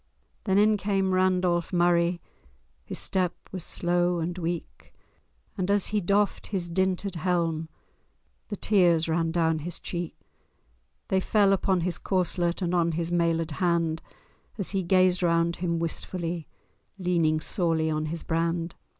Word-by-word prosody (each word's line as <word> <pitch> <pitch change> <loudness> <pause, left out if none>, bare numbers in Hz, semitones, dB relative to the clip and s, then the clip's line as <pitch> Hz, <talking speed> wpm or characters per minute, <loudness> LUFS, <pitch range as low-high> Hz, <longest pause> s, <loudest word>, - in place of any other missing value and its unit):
V - - -45 0.4
Then 190 -2 +2
in 210 +1 +4
came 195 -2 0
Randolph 185 -2 +2
Murray, 175 -1 +2 0.6
His - - -6
step 185 -3 0 0.2
was 185 -3 -5
slow 175 0 0
and 170 +1 -2
weak, 170 -1 -5 0.6
And, 185 -2 -2
as 200 -1 +2
he 210 -1 0
doffed 200 +3 +1
his 185 -4 -3
dinted 190 +1 0
helm, 165 -2 0 0.8
The 205 - -4
tears 175 -6 +3
ran 165 0 +1
down 165 -2 +1
his 170 +3 -5
cheek: 175 -2 -5 0.9
They 190 - +3
fell 200 +1 +3
upon 190 -1 +1
his 175 +1 -1
corslet 180 -1 0
And 175 0 -1
on 170 -2 +2
his 170 +1 -2
mailed 165 -1 +1
hand, 165 -1 0 0.6
As 195 - -1
he 195 -1 0
gazed 185 0 +3
around 170 -1 +2
him 170 -1 -1
wistfully, 170 0 -3 0.5
Leaning 170 -4 +1
sorely 160 -1 0
on 155 0 -1
his 165 +1 -5
brand. 165 +1 -1
175 Hz, 145 wpm, -27 LUFS, 165-185 Hz, 0.9 s, in